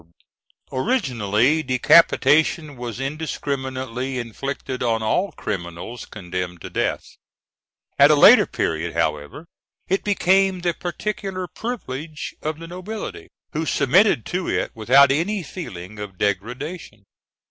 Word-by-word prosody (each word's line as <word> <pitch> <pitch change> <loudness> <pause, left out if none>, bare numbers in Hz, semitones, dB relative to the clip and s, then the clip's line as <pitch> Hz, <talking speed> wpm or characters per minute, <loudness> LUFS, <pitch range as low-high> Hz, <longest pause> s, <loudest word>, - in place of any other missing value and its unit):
] - - -40
Originally, 130 - +1
decapitation 150 +2 +4
was 120 -1 -6
indiscriminately 130 -3 -3
inflicted 130 +2 -5
on 115 -2 0
all 180 - +1
criminals 85 +6 -6
condemned 90 -2 -5
to - - -9
death; - - -1 1.0
at - - +8
a - - +6
later - - +8
period, 80 +1 -2
however, 75 - -2 0.4
it 195 +2 0
became 190 -1 +2
the 175 -1 0
particular 185 +1 -4
privilege 155 - -6
of 155 0 -3
the 165 +1 -9
nobility, 185 +5 -7 0.3
who 155 - -1
submitted 160 - +3
to 180 0 -3
it - - -1
without 130 +5 +5
any 180 +7 0
feeling 105 - -8
of 100 -3 -7
degradation. 110 - -3
135 Hz, 115 wpm, -22 LUFS, 110-175 Hz, 1.0 s, at